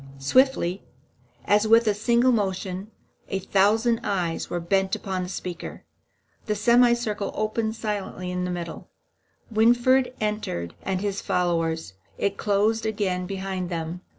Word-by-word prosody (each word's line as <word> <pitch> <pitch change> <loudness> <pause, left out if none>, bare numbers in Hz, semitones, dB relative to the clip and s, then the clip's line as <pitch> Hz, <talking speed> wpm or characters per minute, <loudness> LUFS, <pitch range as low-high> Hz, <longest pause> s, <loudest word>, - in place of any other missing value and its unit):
Swiftly, 185 - +2 0.6
and - - +2
as 215 +1 0
with 230 +1 +6
a 210 - +4
single 235 +4 +3
motion, 190 -2 -2 0.4
a 195 - -2
thousand 215 +5 +2
eyes 175 -4 -1
were 175 - -2
bent 190 +3 +1
upon 190 -2 -3
the 180 - -4
speaker. 180 -2 -6 0.6
The 210 - 0
semicircle 235 -2 +3
opened 220 +1 -1
silently 200 -4 -4
in 180 0 -2
the 180 - -2
middle; 175 -2 -6 0.6
Winfried 245 +3 +3
entered 210 - -2
with 190 -1 0
his 200 -1 -2
followers; 165 - 0 0.2
it 200 0 0
closed 210 +3 +1
again 190 -4 -1
behind 190 -2 -3
them. 170 0 -4
200 Hz, 135 wpm, -25 LUFS, 180-220 Hz, 0.6 s, with